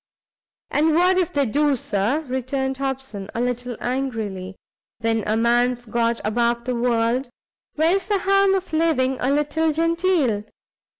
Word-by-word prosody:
"And 310 +1 +2
what 365 +2 +4
if 360 - 0
they 285 -1 +1
do, 290 +4 +2
Sir?" 230 +5 0
returned 265 -1 -2
Hobson, 265 -7 -4
a - - -1
little 245 -1 -2
angrily; 220 -8 -3 0.4
"when 225 -1 0
a 215 +1 +1
man's 240 +1 +2
got 230 +1 0
above 235 +2 0
the 250 - -1
world, 240 +1 0 0.5
where's 345 +5 +2
the 410 -1 +2
harm 390 0 +3
of 375 -3 -4
living 270 -5 +1
a 255 - 0
little 295 +3 +1
genteel? 330 - +1
260 Hz, 140 wpm, -22 LUFS, 235-315 Hz, 0.5 s, what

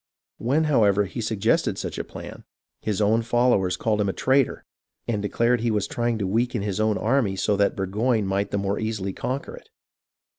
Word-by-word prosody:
When, 140 +7 +1
however, 105 -9 +3
he 115 +5 -5
suggested 110 -2 +1
such - - -4
a - - -2
plan, - - -10 0.4
his 105 -2 -1
own 110 +3 +3
followers 115 -5 +2
called 105 -2 0
him 100 - +1
a - - -1
traitor, 135 0 +1 0.4
and 110 -3 -1
declared 115 +3 +1
he 120 - +1
was 105 -2 0
trying 120 -1 -1
to 100 - -2
weaken 115 +2 0
his 100 -1 -2
own 110 -1 +2
army 115 -4 +1
so 105 +2 +1
that 100 0 +2
Burgoyne 105 +4 0
might 100 +1 -1
the 100 - -1
more 100 +1 -1
easily 110 -3 -3
conquer 130 +7 -4
it. - - -15
110 Hz, 190 wpm, -24 LUFS, 100-120 Hz, 0.4 s, however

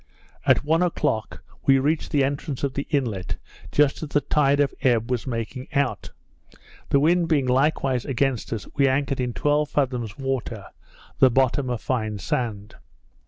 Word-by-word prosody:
At - - +4
one 160 +3 +2
o'clock 160 -10 -1 0.2
we 135 - +7
reached 150 +4 0
the 140 -2 +2
entrance 140 0 -3
of 140 -2 0
the 140 - -4
inlet 120 - -1 0.4
just 145 -1 +2
as 155 - -5
the 145 - +2
tide 140 -2 +2
of 145 -1 +2
ebb 120 -2 +2
was 125 +1 -1
making 125 +3 -4
out; 140 -2 0 0.8
the 140 - +4
wind 170 +3 +3
being 150 -5 +2
likewise 130 -1 +1
against 135 -2 -1
us, 110 -4 -3
we 140 - +4
anchored 135 0 0
in 125 -1 -1
twelve 145 +4 +1
fathoms 125 -6 -1
water, 135 -2 -3 0.5
the 130 - +7
bottom 130 +1 +1
a 120 - -1
fine 110 -4 -2
sand. 105 -1 -3
135 Hz, 165 wpm, -24 LUFS, 125-145 Hz, 0.8 s, we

